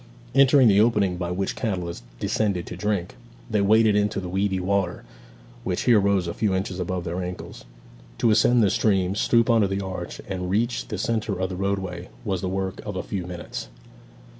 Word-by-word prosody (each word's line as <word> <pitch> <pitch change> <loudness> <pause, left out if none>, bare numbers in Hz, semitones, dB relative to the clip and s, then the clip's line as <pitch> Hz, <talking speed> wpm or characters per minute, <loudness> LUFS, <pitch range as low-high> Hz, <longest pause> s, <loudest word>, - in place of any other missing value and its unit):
Entering 135 -1 +6
the 100 -1 +5
opening 105 -5 +2
by 90 -1 -3
which 95 +2 -2
cattle 90 -7 -2 0.3
descended 100 -5 0
to - - -7
drink, 100 -1 -2 0.3
they 110 -3 +1
waded 110 +1 +4
into 105 -1 +1
the 90 - -5
weedy 95 +1 0
water, 95 -1 -1 0.6
which 90 -6 -1
here 120 -4 +5
rose 100 -2 +2
a 85 - -3
few 105 -3 0
inches 95 -1 -3
above 90 0 -2
their 85 +2 -3
ankles. 90 0 -7 0.5
To 115 - +3
ascend 115 +2 +4
the 100 - +3
stream, 95 -4 +2
stoop 115 +3 +3
under 115 -4 +4
the 95 +1 -2
arch, 95 -2 -6
and 90 -2 -3
reach 115 +5 0
the 105 - -4
centre 105 -2 -1
of 95 0 -1
the 95 - -5
roadway, 95 -2 -3 0.2
was 95 -4 -1
the 95 - -2
work 95 0 -3
of 105 -2 -5
a 95 - -3
few 90 -3 -4
minutes. 90 -7 -6
95 Hz, 190 wpm, -24 LUFS, 90-105 Hz, 0.6 s, Entering